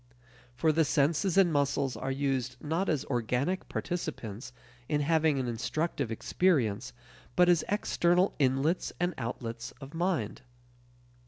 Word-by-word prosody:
For 155 +6 +3
the 160 +1 +3
senses 160 +6 +1
and 180 -4 +5
muscles 140 -2 +1
are 110 +5 -4
used 135 -2 -1
not 165 +7 -1
as 150 -3 0
organic 125 +8 -1
participants 130 - -4 0.4
in 150 -1 +1
having 160 -1 +2
an 130 -2 -1
instructive 135 +2 -2
experience, 120 - +1 0.4
but 180 - +5
as 175 -3 +4
external 180 -2 +2
inlets 135 +5 +1
and 175 +1 +1
outlets 115 0 -5
of 140 +1 -10
mind. 165 - -1
145 Hz, 130 wpm, -30 LUFS, 125-170 Hz, 0.4 s, and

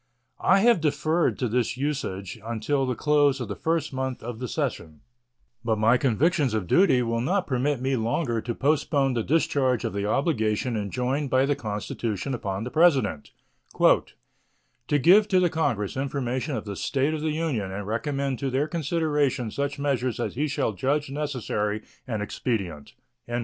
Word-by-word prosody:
I 195 +1 +5
have 235 -5 +4
deferred 155 +3 +1
to 125 - -1
this 120 +1 0
usage 120 -8 -3
until 115 +5 -1
the 125 - -1
close 145 +1 +3
of 120 - -4
the - - -4
first 165 -3 -1
month 130 -2 -3
of 115 -1 -6
the 125 - -3
session, 85 - -3 0.6
but 115 -2 +1
my 110 +3 +4
convictions 135 - +1
of 105 -4 -1
duty 130 - +4
will 115 0 -1
not 185 +9 0
permit 135 +1 0
me 135 +1 0
longer 120 +1 -1
to 115 +1 -4
postpone 140 -2 +1
the 120 - 0
discharge 130 -3 +1
of - - -2
the 100 0 -2
obligation 115 -2 0
enjoined 125 +7 -1
by 130 +1 +3
the 145 +1 +1
Constitution 110 +2 -3
upon 100 -4 -3
the 125 - -5
President 135 - +3 0.5
"to 125 +5 -1
give 185 +9 +6
to 185 -3 +3
the 175 -2 +2
Congress 120 -11 -1
information 135 0 -2
of - - -4
the 100 -1 -5
state 140 +8 0
of 155 - -3
the 160 - 0
Union 140 -12 -2
and 100 +1 -5
recommend 135 +4 -2
to 140 - -1
their 135 +4 0
consideration 150 -6 0
such 140 +3 -2
measures 130 -4 -1
as 120 - -2
he 150 +5 -1
shall 135 -6 -1
judge 140 +8 -1
necessary 120 -7 -2 0.2
and 110 -4 -2
expedient." 95 - -3
130 Hz, 170 wpm, -26 LUFS, 110-145 Hz, 0.6 s, give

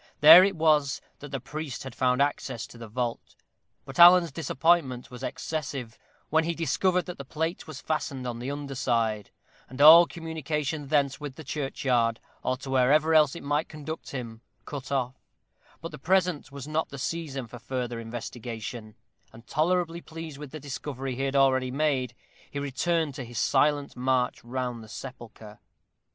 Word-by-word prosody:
There 160 +5 +11
it 195 0 +1
was 155 -3 +2 0.2
that 145 - -9
the 135 -1 -3
priest 145 0 -6
had 130 -2 -8
found 125 +2 +2
access 140 -5 -3
to - - -14
the 115 - -8
vault; 120 +1 -4 0.5
but 135 +3 -8
Alan's 175 -1 +8
disappointment 160 -5 +1
was 125 - -9
excessive, 140 -7 -5 0.3
when 160 +1 +4
he 170 0 -1
discovered 180 +4 +1
that 180 -4 -8
the - - -5
plate 160 +6 -3
was 145 -4 -8
fastened 140 -4 -3
on 120 -1 -4
the 125 +3 -4
underside, 125 -7 -1 0.4
and 130 +1 -10
all 165 +4 +10
communication 155 -2 -4
thence 140 -2 +1
with 145 -3 -7
the 160 - -9
churchyard, 130 -5 0 0.2
or 130 - -1
to 135 0 -8
wherever 145 +5 +4
else 155 -2 +5
it - - -8
might 145 +2 -1
conduct 155 +1 -7
him, 115 -4 -6 0.2
cut 140 -2 -7
off: 130 -1 -2 0.6
but 165 - -6
the 150 - -9
present 180 -2 +1
was 140 0 -8
not 155 +1 -1
the 140 - -8
season 140 -2 -4
for 120 +1 -11
further 120 -1 -4
investigation, 115 -1 -7 0.4
and 115 +1 -15
tolerably 170 +4 0
pleased 160 -3 -9
with 150 -2 -8
the 155 - -8
discovery 135 -2 -5
he 135 - -4
had 135 0 -2
already 130 -2 +3
made, 130 -3 0 0.3
he - - -7
returned 145 +3 -1
to 135 - -6
his 120 -1 -9
silent 145 +5 +2
march 125 0 0
round 120 -1 -4
the 110 - -14
sepulchre. 115 -3 -10
140 Hz, 170 wpm, -27 LUFS, 125-155 Hz, 0.6 s, There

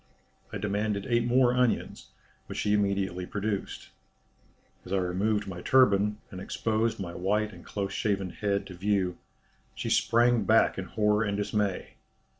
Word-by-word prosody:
I - - -4
demanded 105 0 -1
eight 120 -1 +2
more 125 0 +4
onions, 125 -2 0 0.4
which - - -7
she 105 - +1
immediately 100 -3 0
produced. 100 -1 -4 0.9
As 90 - -11
I 100 - +2
removed 100 +3 0
my 90 -2 -6
turban, 105 -5 +4
and 95 -2 -7
exposed 110 +2 -1
my 85 -3 -5
white 105 +4 0
and - - -13
close 100 -1 -4
shaven 100 -4 -1
head 100 -1 -1
to 95 - -9
view, 95 -1 -1 0.6
she - - -3
sprang 120 -1 +3
back 110 -1 +3
in 95 - -4
horror 105 +1 +1
and 100 -2 -1
dismay. 105 -2 -2
105 Hz, 150 wpm, -28 LUFS, 95-110 Hz, 0.9 s, more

